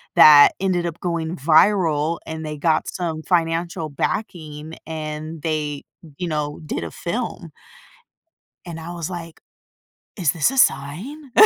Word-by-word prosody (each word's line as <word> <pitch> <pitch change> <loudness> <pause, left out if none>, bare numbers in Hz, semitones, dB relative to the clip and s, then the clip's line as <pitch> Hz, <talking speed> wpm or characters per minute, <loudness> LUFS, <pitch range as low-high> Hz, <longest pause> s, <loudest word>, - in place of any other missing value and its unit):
that 145 -1 +9
ended 180 -3 0
up 170 -1 -6
going 170 -1 -2
viral, 160 0 +3
and 160 0 -6
they 150 -1 -5
got 155 +1 +1
some 165 -3 -3
financial 165 -1 0
backing, 155 -2 -4
and 155 0 -6
they, 150 -3 -2 0.3
you 175 - -3
know, 150 -2 -2
did - - -3
a - - -6
film." - - -4 1.1
And 170 -2 -7
I 165 +2 -7
was 170 0 -4
like, 165 -2 -8 0.8
"Is 170 -7 +2
this 165 - +2
a 270 - -3
sign?" 245 - 0
160 Hz, 135 wpm, -22 LUFS, 155-175 Hz, 1.1 s, that